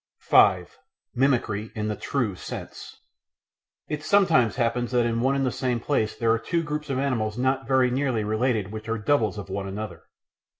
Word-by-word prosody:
§ - - -70 0.2
5 - - +4 0.3
Mimicry 120 -5 0
in 105 -1 -2
the 105 - -2
True 115 -4 -2
Sense - - -9 0.9
It 150 0 -4
sometimes 160 - +3
happens 120 -1 0
that 120 -1 +3
in 115 0 0
one 135 +2 +2
and 135 -1 +1
the 130 - 0
same 125 -2 -1
place 115 -4 -1
there 115 -1 +1
are 115 - +2
two 170 +6 -1
groups 150 -1 -4
of 135 - -1
animals 120 -5 -1
not 130 +2 0
very 130 -2 +3
nearly 130 -4 0
related 110 -1 0
which 110 +1 -7
are 115 - 0
"doubles" 110 -3 +1
of 100 -2 -7
one 100 0 -3
another. 95 -4 -6
120 Hz, 185 wpm, -25 LUFS, 110-135 Hz, 0.9 s, 5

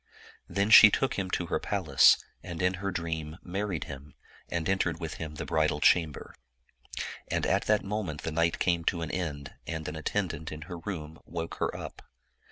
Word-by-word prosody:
Then 100 +2 0
she 110 - +11
took 135 +5 +1
him 95 -2 -2
to 90 - -1
her - - -1
palace, - - +5 0.2
and 85 -3 -7
in 90 +2 +2
her 100 - -1
dream 80 -3 -4
married 95 -1 -2
him, 70 0 -10 0.3
and 85 -2 -2
entered 90 -4 +1
with 80 -2 -5
him 80 -1 -5
the - - -5
bridal 75 -1 +1
chamber. 80 -1 +2 0.9
And - - -1
at - - +1
that 105 -1 +3
moment 100 -7 -3
the 80 - -2
night 85 +1 +1
came 85 -2 +1
to 85 -2 0
an 80 - -4
end, 75 -6 -4
and 80 0 -4
an - - -4
attendant 80 -1 -2
in 75 0 -7
her 85 +2 -7
room 80 -4 -6
woke 85 0 -5
her - - -1
up. - - -8
85 Hz, 185 wpm, -29 LUFS, 80-95 Hz, 0.9 s, she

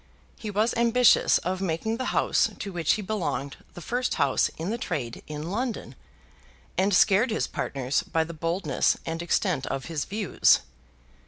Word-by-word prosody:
He 215 - -5
was 215 +3 +1
ambitious 235 +1 +4
of 185 +2 -3
making 190 +5 -1
the 255 - -3
house - - +2
to 200 - -5
which 165 -3 +2
he 215 - -3
belonged 185 -9 -3 0.2
the 175 - -8
first 250 +7 -1
house - - +2
in 165 +6 -3
the 235 - -3
trade 125 - -4
in 155 +3 -5
London, 225 - -3 0.8
and 190 +2 +2
scared 205 +5 +4
his 220 - 0
partners 135 0 -2
by 160 - 0
the 165 +1 -8
boldness 165 -3 0
and 165 +1 -3
extent 175 -4 0
of 135 0 -3
his 160 -4 -3
views. 205 -1 +3
185 Hz, 165 wpm, -26 LUFS, 160-220 Hz, 0.8 s, ambitious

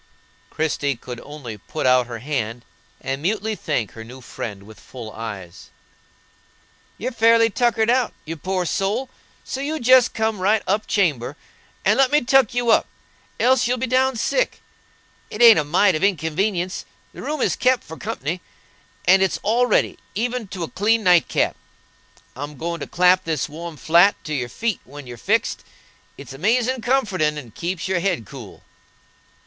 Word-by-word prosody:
Christie 145 -3 -1
could 120 +1 -8
only 135 -8 -8
put 155 - -5
out 125 -1 +4
her 120 -1 -6
hand, 120 -3 -4 0.4
and 135 +1 -3
mutely 215 +5 -1
thank 145 - -2
her 115 - -9
new 125 +3 -11
friend 105 -5 -7
with 110 0 -14
full 120 -4 -9
eyes. 100 -7 -8 1.3
"You're 250 +5 -3
fairly 230 -1 +4
tuckered 235 0 +2
out, 250 -2 +2
you 165 +1 -5
poor 185 +3 -2
soul, 210 +9 -1 0.3
so 270 - -5
you 310 +3 -2
jest 255 0 +5
come 220 -2 0
right 205 +3 +2
up 205 +3 0
chamber 145 - 0 0.5
and - - +3
let 270 -2 +4
me 295 0 +4
tuck 260 -2 +3
you 240 -1 +2
up, - - +3 0.5
else 255 -1 +3
you'll 250 +1 0
be 255 - -1
down 260 +1 +2
sick. - - -1 0.7
It - - -7
ain't 230 -6 +8
a - - +1
mite 180 +6 +3
of 155 - -2
inconvenience; 180 +1 0 0.3
the - - -9
room 305 0 -3
is - - +1
kep 255 -1 +2
for 160 - -9
company, 155 +4 -4 0.6
and 190 +1 +6
it's 190 -2 +1
all 235 +4 +2
ready, - - +1 0.2
even 240 +1 -2
to 185 -2 -5
a - - -3
clean 220 +5 +1
night 180 -3 +5
cap. - - 0 0.8
I'm 145 +2 -7
goin' 170 +2 -3
to - - -6
clap 180 +1 +4
this 160 -5 -1
warm 165 +1 -8
flat 170 +7 +5
to 155 - -5
your 125 -4 -2
feet 225 - -2
when 145 +1 -11
you're 120 -1 -9
fixed; - - 0 0.5
it's - - -10
amazin' 235 - +1
comfortin' 190 - +1
and 120 -7 -9
keeps 175 +1 -3
your 185 -2 0
head 175 - -1
cool." - - -11
185 Hz, 170 wpm, -22 LUFS, 145-230 Hz, 1.3 s, ain't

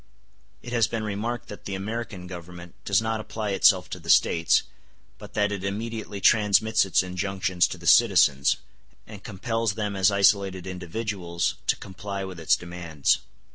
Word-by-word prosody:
It 120 - -7
has 115 -2 +3
been 115 -2 -3
remarked 110 +3 -3
that 105 - -10
the 100 - -4
American 100 -1 -5
Government 90 -1 -10
does 100 +2 +2
not 110 0 -1
apply 110 -1 -4
itself 95 - +4
to - - -5
the - - -11
States, 85 -1 +4 0.6
but - - -12
that 105 -1 +1
it 100 -2 -4
immediately 105 +1 -4
transmits 110 +1 +4
its 95 - +2
injunctions 95 -1 0
to - - -7
the 85 - -13
citizens, 85 - +5 0.5
and 105 -2 -12
compels 115 +1 -2
them 105 -2 -3
as 95 0 +4
isolated 100 -2 +2
individuals 90 -1 -3
to - - +3
comply 100 +1 -6
with 95 -3 -7
its 80 - +3
demands. 85 -4 -1
100 Hz, 160 wpm, -25 LUFS, 90-110 Hz, 0.6 s, citizens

